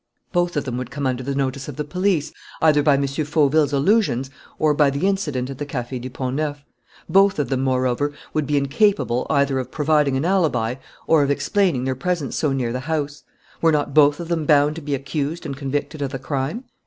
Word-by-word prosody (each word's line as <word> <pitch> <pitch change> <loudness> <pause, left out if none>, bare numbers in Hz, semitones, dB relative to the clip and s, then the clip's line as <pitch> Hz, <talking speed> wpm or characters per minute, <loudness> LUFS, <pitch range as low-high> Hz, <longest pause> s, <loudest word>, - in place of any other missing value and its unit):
"Both 175 -3 0
of 145 - 0
them 125 -2 -3
would 125 -1 -5
come 145 +1 -4
under 130 -1 -1
the 135 +2 -3
notice 135 0 -2
of 145 - -6
the 150 - -3
police, 180 0 0 0.3
either 150 -2 +4
by 145 -1 +4
M. 140 0 +1
Fauville's 150 +1 +1
allusions 140 - +2 0.3
or 155 -1 +3
by 145 -1 +4
the 140 +6 -1
incident 150 -10 -1
at 135 - -9
the 145 - -3
Café 125 -2 -4
du 130 - -6
Pont 130 0 -4
Neuf; 145 -2 -3 0.4
both 195 +3 +4
of 145 -5 -1
them, 130 -1 0
moreover, 130 +2 0 0.2
would 155 -3 0
be 145 0 +1
incapable 140 - +1
either 140 -1 +2
of 130 - -5
providing 150 -3 +2
an 135 - -1
alibi 155 -12 +1 0.3
or 160 -2 +4
of 140 - +1
explaining 145 0 +1
their 130 - 0
presence 160 -1 -2
so 150 - +1
near 125 -3 -1
the 125 - -2
house: 150 0 -3 0.4
were 165 - +4
not 145 -2 0
both 145 0 +5
of 170 - -5
them 165 -3 -1
bound 150 0 +4
to - - -6
be 145 -1 -2
accused 145 +4 -3
and 140 - -4
convicted 145 +2 -3
of 140 - -1
the 135 - -4
crime? 135 - -3
145 Hz, 215 wpm, -22 LUFS, 135-155 Hz, 0.4 s, both